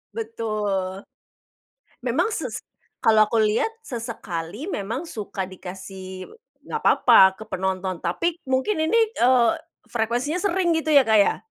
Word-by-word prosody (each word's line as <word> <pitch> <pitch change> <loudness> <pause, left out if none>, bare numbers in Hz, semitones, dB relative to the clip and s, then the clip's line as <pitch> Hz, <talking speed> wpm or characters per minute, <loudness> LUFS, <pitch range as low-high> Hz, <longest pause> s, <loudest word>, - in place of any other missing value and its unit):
Betul, 210 -4 -3 1.0
memang 260 - +1
se - - -3
se - - -4 0.4
kalau 220 -1 +5
aku 230 - +1
lihat, 215 - +2 0.2
sesekali 220 - -5
memang 240 - -3
suka 200 -6 -5
dikasih 185 0 -9 0.4
nggak - - -4
apa-apa - - +6 0.2
ke - - -6
penonton, 185 -1 -2
tapi 340 -1 0
mungkin 265 +6 +1
ini, 460 - +4 0.2
eee, 250 +3 +4 0.3
frekuensinya 245 +9 -1
sering 375 -3 +1
gitu 320 -1 -1
ya 280 -3 +6
Kak 220 -1 +5
ya? - - +2
225 Hz, 130 wpm, -23 LUFS, 190-265 Hz, 1.0 s, apa-apa